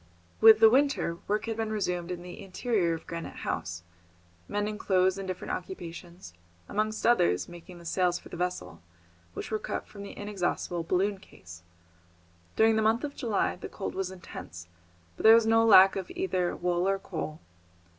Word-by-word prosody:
With 220 -1 +8
the 220 0 +8
winter, 260 - +1
work 210 +1 0
had 225 -1 -3
been 220 -1 -2
resumed 180 -5 -2
in 175 -1 -5
the 180 0 -9
interior 195 -3 0
of 165 - -10
Granite 170 0 -6
House, 85 +1 -3 0.6
mending 210 +1 -2
clothes 190 -1 +2
and 195 - -5
different 185 -1 -5
occupations, 175 - -7 0.3
amongst 215 +1 -2
others 90 - +3
making 175 +1 -12
the 170 - -14
sails 175 +1 +1
for - - -13
their 175 - -8
vessel, 180 - -4 0.5
which - - -6
were 215 - 0
cut - - -4
from 200 - -12
the 200 - -9
inexhaustible 185 -4 -2
balloon 190 +4 0
case. 85 - -14 0.9
During 220 0 +4
the - - +2
month 225 +4 +2
of 285 -1 -4
July 225 -8 -1
the - - -8
cold 195 - -5
was 190 -1 -2
intense, 130 - -10 0.5
but - - -8
there 220 +1 +9
was 230 -1 +4
no 225 0 +4
lack 195 -4 +7
of 190 -2 -4
either 185 -2 -1
wood 175 +1 0
or 195 0 +2
coal. 160 -4 -6
190 Hz, 175 wpm, -28 LUFS, 175-215 Hz, 0.9 s, there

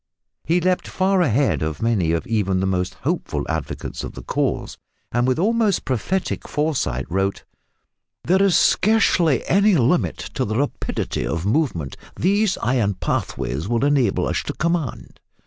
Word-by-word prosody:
He 170 +3 +2
leaped 180 +1 0
far 190 0 +1
ahead 140 -3 +2
of 80 -1 -2
many 105 -8 +1
of 85 -1 -1
even 100 -4 0
the 95 - 0
most 90 -1 -1
hopeful - - -1
advocates 80 -2 -4
of - - -6
the - - -9
cause, - - -2 0.4
and 120 +1 +1
with 130 - +1
almost 215 +2 +1
prophetic 140 - -2
foresight 140 - -1
wrote, 95 +2 -1 0.8
"there 185 +3 +3
is 195 -3 +4
scarcely 185 - +3
any 200 +1 +4
limit 145 +5 +2 0.2
to 130 - -1
the 110 -1 -2
rapidity 145 +2 -2
of 85 +2 -2
movement 105 - -1 0.2
these 200 +2 +1
iron 115 -5 +1
pathways 75 0 -2
will 120 +4 +1
enable 135 -8 +2
us - - -1
to - - -5
command." 170 -6 -2
130 Hz, 150 wpm, -22 LUFS, -, 0.8 s, is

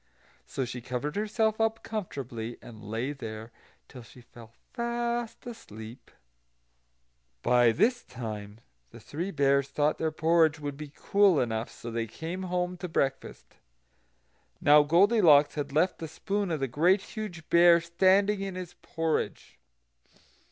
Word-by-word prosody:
So 135 - -3
she 125 0 -7
covered 130 +4 -4
herself 220 +1 0
up 225 0 0
comfortably, 130 - -5
and 110 -2 -13
lay 115 +7 -3
there 110 -4 -8 0.4
till 125 - -11
she 115 +2 -16
fell 115 -1 -15 0.2
fast 235 -1 -3
asleep. 115 - -10 1.3
By 120 -1 +4
this 240 - +1
time 110 -2 -8 0.3
the - - -13
Three 170 +6 -5
Bears 140 -4 +2
thought 145 +2 0
their 160 - 0
porridge 160 0 +2
would 145 -1 -5
be 150 0 -9
cool 200 -6 +3
enough; 110 -1 -2
so 120 - -9
they 115 0 -2
came 165 - -6
home 180 0 -1
to 180 - -5
breakfast. 135 -5 -3 1.0
Now 150 +1 +6
Goldilocks 165 -2 +5
had 145 -2 -4
left 170 +6 +1
the 160 - -5
spoon 200 +5 -3
of 160 -4 -2
the 135 - 0
Great 175 - +3
Huge 200 -8 -8
Bear 170 0 +7
standing 190 +4 +2
in 195 -1 -4
his 180 -1 -7
porridge. 165 -1 -3
155 Hz, 140 wpm, -28 LUFS, 125-190 Hz, 1.3 s, Bear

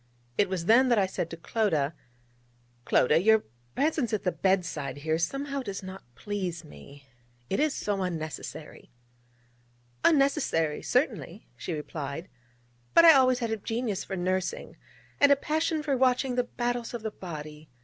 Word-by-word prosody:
It 200 - +2
was 185 -3 -3
then 250 +6 +5
that 235 - +4
I 200 - +4
said 180 -3 -3
to 165 - -7
Clodagh: 165 - 0 0.9
'Clodagh, 150 +6 +4
your 220 +1 +5 0.3
presence 290 -3 +1
at 215 - -1
the 180 - +1
bed 190 -1 +1
side 145 -4 -5
here 160 0 +1
somehow 275 - -2
does 200 -5 -6
not 190 +1 -8
please 180 - -4
me. 140 -1 -14 0.5
It 195 - +1
is 300 -1 +1
so 205 -2 -2
unnecessary.' 160 -3 -6 1.1
'Unnecessary 275 - +2
certainly,' - - -1
she 175 - -5
replied: 150 +1 -5 0.7
'but 335 - +8
I 325 - +10
always 255 -2 +4
had 235 -3 -2
a 220 - 0
genius 225 -1 -3
for 195 - -5
nursing, 185 +1 -2 0.4
and 285 0 +6
a - - +8
passion 310 +2 -1
for 285 -3 0
watching 255 0 +2
the 245 0 +1
battles 240 0 -3
of 230 - -6
the 220 - -3
body. 155 -5 -9
200 Hz, 160 wpm, -28 LUFS, 165-255 Hz, 1.1 s, I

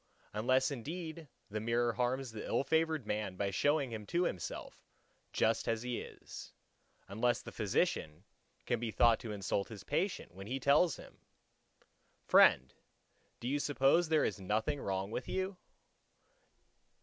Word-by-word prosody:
Unless 130 +6 +2
indeed 160 +4 -6 0.2
the 110 - -2
mirror 115 +2 +1
harms 125 +2 -1
the 110 -1 -6
ill - - 0
favoured 160 -1 +1
man 105 -3 -2
by 100 +1 -1
showing 145 +5 +1
him 110 -2 -6
to 175 +1 +1
himself 95 - -4 0.5
just - - +1
as 115 0 0
he 125 -1 -2
is; - - -10 0.5
unless 120 +5 0
the - - -8
physician 75 +3 -1 0.4
can 120 - 0
be 120 -1 -2
thought 115 +1 +4
to 115 - -6
insult 100 -1 -1
his 105 -4 -9
patient, 165 - -2
when 95 +2 -9
he 130 +4 -2
tells 145 +6 +4
him:—"Friend, 65 - 0 0.7
do 120 - -5
you 145 +3 +1
suppose 145 +4 +3
there 155 -2 +4
is - - -2
nothing 110 +9 -1
wrong 95 +1 -2
with 125 - -4
you? 190 0 -2
120 Hz, 145 wpm, -34 LUFS, 105-145 Hz, 0.7 s, thought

